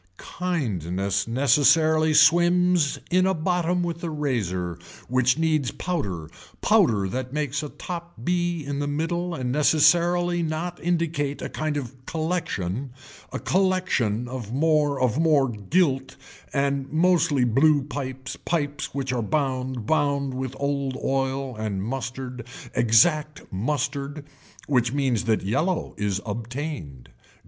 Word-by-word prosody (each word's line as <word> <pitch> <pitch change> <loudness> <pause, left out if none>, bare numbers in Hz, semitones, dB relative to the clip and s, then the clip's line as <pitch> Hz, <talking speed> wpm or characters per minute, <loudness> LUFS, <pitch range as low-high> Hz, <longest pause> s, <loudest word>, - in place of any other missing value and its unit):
Kindness 100 - -2
necessarily 155 +5 +4
swims 175 -1 +4
in 185 +1 +4
a 190 - +1
bottom 180 +1 0
with 170 0 -4
a 170 - -2
razor 95 - -2 0.3
which 125 +1 +2
needs 155 -5 +1
powder 100 - -3 0.3
powder 100 -4 +3
that 130 +5 -4
makes 145 -2 -1
a 150 - -5
top 170 +1 -7
be 175 -2 0
in 140 0 -3
the 145 - -1
middle 170 +4 -2
and 125 -4 -2
necessarily 170 +4 +3
not 165 +2 -3
indicate 165 -5 0
a - - -4
kind 155 -1 -2
of 130 -1 -7
collection, 155 - -2 0.4
a - - -3
collection 180 - +1
of 120 -4 -6
more 150 0 +2
of 130 +2 +1
more 155 -4 +4
gilt 135 - 0 0.4
and 140 -1 0
mostly 160 -4 +3
blue 140 +5 +4
pipes 130 -2 -5
pipes 145 -5 -3
which 135 -2 -2
are 120 - 0
bound 130 -2 -1
bound 140 -1 +1
with 130 0 -4
old 140 -2 -1
oil 135 -1 -1
and 105 -3 -3
mustard 125 +1 -5 0.3
exact 150 +6 +3
mustard 140 +6 -2 0.4
which 125 -4 +2
means 130 -5 0
that 110 -2 +1
yellow 160 - 0
is 100 -2 -1
obtained. 115 - -5
140 Hz, 125 wpm, -25 LUFS, 125-160 Hz, 0.4 s, necessarily